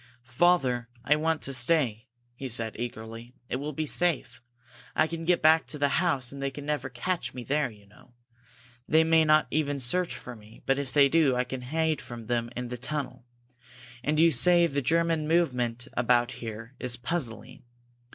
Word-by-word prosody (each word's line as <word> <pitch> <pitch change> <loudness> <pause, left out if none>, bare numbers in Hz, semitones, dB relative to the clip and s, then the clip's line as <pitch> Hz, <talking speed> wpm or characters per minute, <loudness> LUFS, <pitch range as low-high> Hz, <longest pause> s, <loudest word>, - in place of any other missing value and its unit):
"Father, 130 -4 +2 0.2
I 150 - +4
want 160 +1 -1
to 135 - -1
stay!" 125 -3 +2 0.3
he 130 +2 -7
said, 115 -2 -2
eagerly. 115 +1 -7
"It - - -1
will 145 +3 -4
be 155 +2 -3
safe. 170 -2 0 0.5
I - - +4
can 165 0 -5
get 175 -1 +2
back 160 +1 +5
to 150 - -6
the 145 +3 +1
house 140 -9 0
and 140 0 -8
they 140 - -1
can 145 +1 -9
never 145 -3 -2
catch 125 0 -3
me 125 - -6
there, 140 +1 0
you 105 -3 -17
know! 115 +4 -21 0.7
They 160 +1 +4
may 160 0 +4
not 155 0 +4
even 145 -2 0
search 175 +8 +1
for 125 - -8
me, 110 0 -17
but 135 +1 +1
if 140 -2 -4
they 140 -1 +5
do, 145 -3 +3
I 125 - +1
can 125 0 -6
hide 155 +4 -1
from 120 -2 -9
them 120 0 -1
in 125 0 -4
the 125 - -5
tunnel. 135 -2 -4 0.8
And 150 +3 0
you 165 +1 +6
say 175 +1 +5
the 140 -3 -1
German 165 +2 +1
movement 125 -7 0
about 120 0 +2
here 115 0 -8
is 125 -2 -1
puzzling. 120 -4 -3
135 Hz, 190 wpm, -27 LUFS, 120-160 Hz, 0.8 s, you